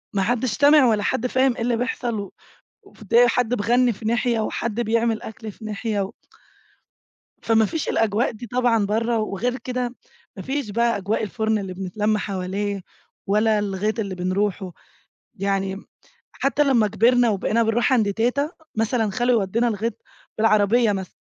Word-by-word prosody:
ما 195 - +2
حدّش 245 +2 0
سامع 290 +1 +6
ولا 215 -3 +2
حد 240 - 0
فاهم 260 0 +2
إيه 240 - -6
اللي 235 0 +1
بيحصَل 240 -2 -2
و 200 -2 -6 0.5
وفدِيّة 240 - +2
حد 245 0 +1
بيغنّي 245 +3 +2
في 220 - -12
ناحية 235 +1 +1
وحد 220 +1 -2
بيعمل 230 0 0
أكْل 220 0 -8
في 220 - -14
ناحية 215 0 -2
و 195 0 -3 1.3
فما 225 -1 +3
فيش 315 +8 -3
الأجواء 225 +1 +1
دي 230 +1 -9
طبعًا 240 -3 +1
برّه 230 +3 0
وغير 220 +4 -2
كده 250 0 -4 0.4
ما 190 - -6
فيش 270 -3 -3
بقى 235 +1 +1
أجواء 205 +3 -1
الفُرن 220 +1 -1
اللي 195 -3 -5
بنتلم 205 +3 -1
حواليه 200 0 -3 0.4
ولا 215 +1 +2
الغيط 205 +2 -2
اللي 195 -3 -3
بنرُوحه. 185 0 -2 0.6
يعني 195 0 -2 0.5
حتى 280 +2 0
لمّا 245 -6 +3
كبِرنا 235 +3 +3
وبقينا 215 +3 +1
بنرُوح 225 +2 +1
عند 215 -5 +2
تيتة، 250 +7 0 0.2
مثلًا 225 -1 0
خالو 245 +4 +1
يودّينا 225 +5 0
الغيط 225 +1 -2 0.4
بالعربية 215 +1 +3
مثلًا 190 -2 -5
220 Hz, 155 wpm, -22 LUFS, 205-240 Hz, 1.3 s, سامع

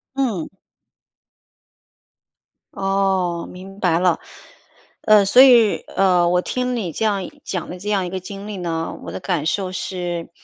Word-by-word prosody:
嗯。 235 -12 -1 2.3
哦， 195 -3 0
明 190 +2 -11
白 170 -4 +2
了。 180 -2 +2 0.8
呃， 215 -1 +5
所 245 +6 +6
以， 240 -5 +6 0.2
呃， 180 -3 +3
我 180 0 +2
听 250 +5 -2
你 200 -8 -3
这 220 - -2
样 200 -4 -1
讲 180 -4 -4
的 180 - -6
这 205 +3 -5
样 195 -3 +1
一 175 - -4
个 190 - -4
经 195 +2 -9
历 210 -2 -6
呢， 165 -2 -3
我 85 - -7
的 95 - -5
感 170 -5 -2
受 185 +2 -1
是 175 -2 -4
190 Hz, 160 characters per minute, -20 LUFS, 175-205 Hz, 2.3 s, 所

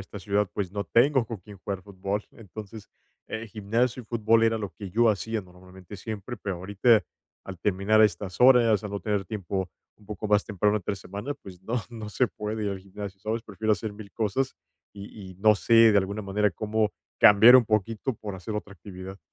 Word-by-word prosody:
esta 100 +2 -9
ciudad, 100 +1 0
pues, 95 -3 -3
no 100 0 -3
tengo 130 0 +3
con 115 - -5
quién 100 +1 -14
jugar 95 0 -5
fútbol. 100 +2 -4
Entonces, 110 0 -10 0.4
eh, 110 +1 -5
gimnasio 115 +4 -1
y - - -21
fútbol 115 -1 +2
era 115 0 +3
lo 105 -3 -4
que 95 +4 -9
yo 115 +4 +4
hacía 110 +2 -2
normalmente 90 +2 -13
siempre, 110 +4 -6
pero 100 -3 -4
ahorita, 100 +4 +3 0.4
al 95 -2 -8
terminar 100 +4 +2
estas 95 -3 +1
horas, 120 -5 +6
al 105 - -5
no 100 0 -4
tener 105 -3 -1
tiempo, 95 -2 -3 0.3
un 105 - -22
poco 105 0 -5
más 105 -1 +3
temprano 105 +1 +1
entre 100 0 -3
semana, 100 +9 -6
pues, 95 -10 -13
no, 110 +5 -4 0.2
no 110 -3 -7
se 125 +4 +1
puede 105 -1 -5
ir 100 - -1
al 100 - -4
gimnasio, 95 0 -9
¿sabes?, 110 +2 -3
prefiero 110 0 -1
hacer 105 +2 -2
mil 105 -1 -11
cosas, 115 +5 -1 0.4
y 100 -1 -10
y - - -17
no 105 +4 +4
sé, 115 +1 +5
de 105 - +5
alguna 100 +2 -2
manera 105 +1 +1
cómo, 110 +3 -1 0.3
cambiar 110 +4 +8
un 125 -3 +7
poquito 110 +4 -1
por 105 -2 -7
hacer 95 +4 -6
otra 105 -1 -5
actividad. 95 +1 -10
105 Hz, 200 wpm, -26 LUFS, 95-110 Hz, 0.4 s, cambiar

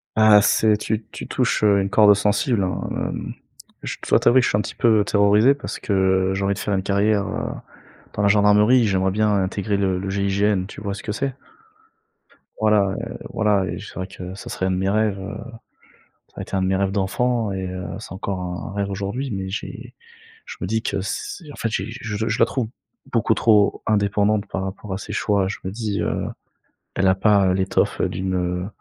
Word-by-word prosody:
Ah 110 -1 +7
c'est 110 +1 +3
tu 110 +1 -3
tu - - -7
touches, - - 0
heu, 100 -1 +5
une 95 - -2
corde 105 0 +6
sensible 105 +2 +1
hein, 90 -1 -2
hem. - - -4 0.5
Je - - -4
dois - - +5
t'avouer 130 +2 +5
que - - -2
je - - +2
suis - - +1
un - - +1
petit 100 - -7
peu 110 -3 +3
terrorisé, 105 +6 +4
parce 145 - -6
que 95 -1 +1
j'ai 100 - -2
envie 100 0 +1
de 100 - -7
faire 105 - -2
une 95 - -1
carrière, 100 +1 +1
heu, - - -3 0.6
dans 105 - -2
la 100 - +3
gendarmerie. 105 +4 +5
J'aimerais 95 -2 +1
bien 105 +2 +1
intégrer 100 +2 -1
le 95 -2 0
le 95 +1 -4
GIGN, 100 0 +1
tu 105 - -10
vois 100 -2 -3
ce 100 - -7
que 105 - -3
c'est? 135 +1 -2 1.3
Voilà, 105 -3 +3
heu, - - -6
voilà, 105 -3 +2
et - - -4
j - - -9
c'est - - -14
vrai 95 - -3
que 95 -1 -8
ça 120 - -9
serait 95 -5 -2
un 95 - 0
de 90 - 0
mes 95 +1 0
rêves, 105 0 +1
heu, 100 +3 -6 0.9
ça - - -32
a - - -2
été - - -8
un 95 - +1
de 95 - +1
mes 95 - +1
rêves 95 0 0
d'enfant 110 +3 0
et 95 -1 -3
heu, 90 0 -5
c'est - - -9
encore 95 0 -4
un 90 0 -5
un - - -8
rêve 100 -1 -1
aujourd'hui, 100 +8 -3
mais 95 -1 -4
j'ai 95 - -7 0.5
je - - -9
me - - -1
dis 110 +3 0
que 95 - -2
c 100 - -5
en - - -10
fait 115 - -1
j'ai 95 -3 -2
je 110 -2 -4
je 110 - -1
la - - +6
trouve 125 -5 -2 0.4
beaucoup 115 -1 +2
trop 105 -3 +3
indépendante 105 0 +1
par 95 - -3
rapport 95 +1 -6
à - - -2
ses 100 - -7
choix. 100 -3 +1
Je 100 - -5
me 95 - -3
dis, 105 -2 -3
heu, - - -1 0.7
elle 95 0 +2
a 95 - +5
pas 100 -2 +3
l'étoffe 95 0 0
d'une, 95 0 -2
heu, 90 0 -1
100 Hz, 225 wpm, -22 LUFS, 95-110 Hz, 1.3 s, Ah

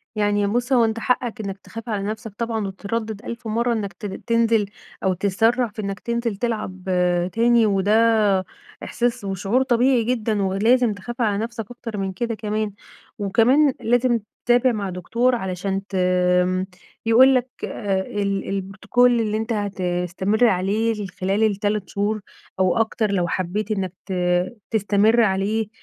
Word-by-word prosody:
يعني 205 -1 +1
بُص، 245 +5 0
هو 240 -3 +5
أنت 220 0 -2
حقّك 245 0 -1
إنّك 195 -2 -5
تخاف 225 +4 -9
على 205 -3 -1
نَفْسك 215 +1 -5
طبعًا 225 -3 -2
وتتردّد 210 +2 -4
ألف 235 0 -6
مرّة 235 +2 +1
إنّك 205 -3 -3
ت - - -10
تنزِل 230 +2 +1 0.4
أو 190 -1 +2
تتسرّع 225 +6 +1
في 215 0 -7
إنّك 195 0 -4
تنزِل 235 -2 -2
تلعب 200 -4 -3 0.5
تاني، 235 0 +4
وده 210 -1 +3 0.4
إحساس 240 -1 -1
وشعور 195 +6 0
طبيعي 250 -1 +3
جدًا 220 -3 0
ولازم 220 +5 +2
تخاف 235 +5 -7
على 210 -3 +1
نَفْسك 225 +1 -4
أكتر 235 -3 -7
من 195 -1 -2
كده 230 +4 -2
كمان. 215 0 -2 0.5
وكمان 245 +8 +3
لازم 245 0 +2 0.3
تتابع 245 +1 +4
مع 205 -4 -3
دكتور 230 +8 0
علشان 195 -1 -3
تم 180 -1 +2 0.4
يقول 255 +4 +6
لك 255 0 +1 0.2
آآ 195 -3 -2
ال 200 0 -2
البروتوكول 210 +5 +1
اللي 215 -1 0
أنت 225 +2 -2
هتستمر 190 +1 0
عليه 210 +2 0
خلال 195 +4 +1
ال3 205 -2 0
شهور 205 +2 -1 0.4
أو 185 +1 +2
أكتر 220 -1 0
لو 180 -3 +1
حبّيت 185 +5 -2
إنّك 190 -4 -2
ت 190 - -4 0.6
تستمر 215 +2 +3
عليه، 210 +1 +1
215 Hz, 145 wpm, -22 LUFS, 195-230 Hz, 0.6 s, يقول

